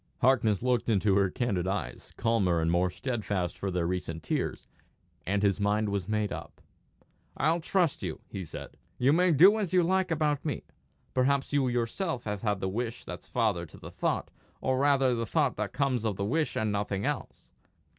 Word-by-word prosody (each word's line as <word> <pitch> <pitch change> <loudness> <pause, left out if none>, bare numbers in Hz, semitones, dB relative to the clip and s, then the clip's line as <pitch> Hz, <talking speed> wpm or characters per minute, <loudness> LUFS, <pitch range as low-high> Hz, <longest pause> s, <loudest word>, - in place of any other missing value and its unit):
Harkness 115 -5 +3
looked 120 -2 +1
into 105 -2 +3
her 100 -1 +3
candid 95 -5 -1
eyes, 95 -2 -4
calmer 100 -7 +2
and 80 0 +1
more 90 +1 +2
steadfast 100 -5 -2
for 100 - -3
their 90 -2 0
recent 85 -2 -3
tears, - - -2 0.6
and 100 +2 +1
his 100 0 +2
mind 105 +1 +1
was 100 -3 -2
made 105 -1 0
up. - - -7 0.8
"I'll 160 +4 +2
trust 175 -2 +1
you," - - -4
he 95 - -6
said; 80 - -9 0.2
"you 130 +3 +4
may 180 +2 +4
do 190 +9 +7
as 195 -4 -2
you 180 -1 +5
like 190 +2 +1
about 150 -3 0
me. 150 - -3 0.5
Perhaps 135 +2 +1
you 140 -2 +3
yourself 125 - -1
have 105 -2 -3
had 105 -4 -1
the 95 - 0
wish 115 +4 -3
that's - - -8
father 105 -8 0
to - - -14
the - - -10
thought, - - -1 0.3
or 130 0 0
rather 135 -2 +4
the 115 -1 -2
thought - - +1
that - - -2
comes 130 -5 0
of 110 -3 0
the 100 - -2
wish 155 +8 0
and 110 -1 0
nothing 100 -1 -1
else? - - -4
115 Hz, 190 wpm, -29 LUFS, 100-140 Hz, 0.8 s, do